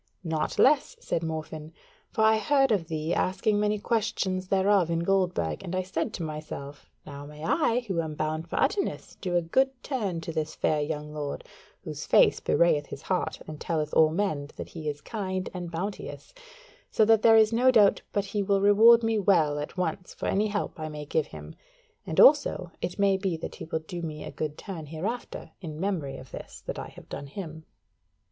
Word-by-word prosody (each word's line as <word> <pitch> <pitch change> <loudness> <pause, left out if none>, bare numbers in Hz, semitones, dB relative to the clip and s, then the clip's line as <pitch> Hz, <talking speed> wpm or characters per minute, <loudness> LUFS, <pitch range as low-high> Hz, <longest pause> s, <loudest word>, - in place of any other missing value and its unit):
"Naught 160 -3 -2
less," 300 - +4
said 170 - -2
Morfinn. 160 -1 -5 0.4
"For 220 - 0
I 220 0 +5
heard 270 0 +3
of 185 -7 +1
thee 160 +1 -2
asking 205 +3 +1
many 210 0 +1
questions 200 -4 -1
thereof 190 -2 +3
in 165 0 0
Goldburg, 180 - 0
and 180 - -4
I 185 - 0
said 180 -3 -2
to 170 - -4
myself, 150 -2 -7 0.2
now 145 0 -8
may 150 +1 -11
I, 245 - +2
who 190 -8 -1
am 155 -2 -5
bound 155 +2 -2
for - - -2
Utterness, 410 -1 -1
do 180 -2 -2
a 175 - +3
good 265 +11 +3
turn 210 - -2
to 165 - -5
this 155 -1 -2
fair 150 -1 +1
young 150 0 -4
lord, 145 -2 -4 0.4
whose - - -6
face - - +5
bewrayeth 150 -4 +2
his 140 - -8
heart, 185 -1 -2
and 155 -1 -9
telleth 155 -2 -2
all 160 -1 +6
men 155 -5 -1
that - - -7
he 155 -3 -5
is 145 0 -5
kind 190 -3 -4
and 175 -2 -5
bounteous; 195 - -6 0.6
so 220 - +3
that 225 0 +5
there 225 0 +7
is 220 0 +5
no 250 +3 +4
doubt 215 -6 +5
but 205 -1 0
he 205 +1 -2
will 195 0 +2
reward 220 +4 +7
me 225 -1 +1
well 160 -7 +3
at 150 +5 -6
once 180 0 -3
for - - -5
any 210 +2 +2
help 205 -4 -3
I 155 0 -4
may 150 -1 -7
give 150 +1 0
him; 75 0 -10 0.5
and 160 - -1
also 275 - +5
it 180 - -3
may 200 -1 +3
be 190 -4 -1
that 160 - -6
he - - -7
will 160 - -2
do 175 -1 -5
me 155 -2 -5
a - - -7
good 150 -1 -4
turn 170 -7 -7
hereafter 190 +11 -5
in 155 -4 -7
memory 170 -8 -2
of 130 -4 -12
this - - -9
that - - -4
I - - -5
have - - -14
done 140 - -7
him." 160 0 -8
175 Hz, 205 wpm, -27 LUFS, 155-205 Hz, 0.6 s, there